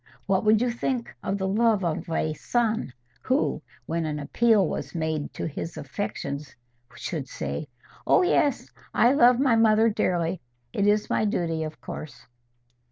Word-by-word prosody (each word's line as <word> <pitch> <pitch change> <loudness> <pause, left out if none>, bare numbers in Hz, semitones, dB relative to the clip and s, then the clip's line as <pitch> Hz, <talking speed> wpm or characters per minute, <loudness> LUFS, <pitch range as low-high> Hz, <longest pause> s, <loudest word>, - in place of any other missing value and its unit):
What 190 -1 +1
would 215 +2 +5
you 250 - +1
think 240 0 -3
of 195 - -2
the 190 -1 -1
love 215 -1 +2
of 165 0 -2
a 155 -1 0
son 225 - -1 0.3
who, 260 +3 0 0.2
when 165 0 -2
an 150 -1 -2
appeal 210 +6 +3
was 140 0 -5
made 160 -2 -2
to - - -3
his 165 +2 -5
affections, 150 -8 -5 0.4
should - - -4
say, 70 +1 -4 0.4
'Oh - - +5
yes, 295 -5 +1 0.2
I 240 +2 +5
love 245 -2 +5
my 265 -4 +4
mother 225 0 +5
dearly: 175 -4 0 0.3
it 200 - +1
is 210 0 +2
my - - +2
duty, 170 -5 -1
of 155 0 -5
course? 155 - -8
200 Hz, 160 wpm, -26 LUFS, 160-230 Hz, 0.4 s, would